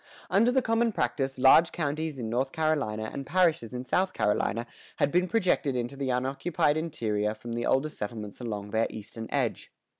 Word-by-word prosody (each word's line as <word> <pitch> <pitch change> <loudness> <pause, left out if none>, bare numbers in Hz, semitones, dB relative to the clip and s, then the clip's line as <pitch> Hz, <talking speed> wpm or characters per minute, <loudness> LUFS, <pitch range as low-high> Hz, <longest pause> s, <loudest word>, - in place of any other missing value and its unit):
[116:1] - - -28 0.3
Under 230 +4 +5
the 260 +1 +3
common 230 0 +2
practice, 135 -9 -1
large 135 +6 +6
counties 155 -1 -2
in 120 -3 -4
North 130 +4 -1
Carolina 140 -9 -1
and 140 - -4
parishes 165 -6 +2
in 125 0 -5
South 185 +7 +1
Carolina 105 +2 0 0.3
had 145 - +1
been 180 +1 +2
projected 180 - +1
into 125 +2 -2
the 135 -1 -3
unoccupied 135 +4 +1
interior 110 -10 -1
from 115 +2 -7
the 120 0 -2
older 135 +3 +2
settlements 105 -4 -6
along 105 -4 -5
their 110 0 +2
eastern 110 +1 -8
edge. - - -2
135 Hz, 180 wpm, -28 LUFS, 115-160 Hz, 0.3 s, large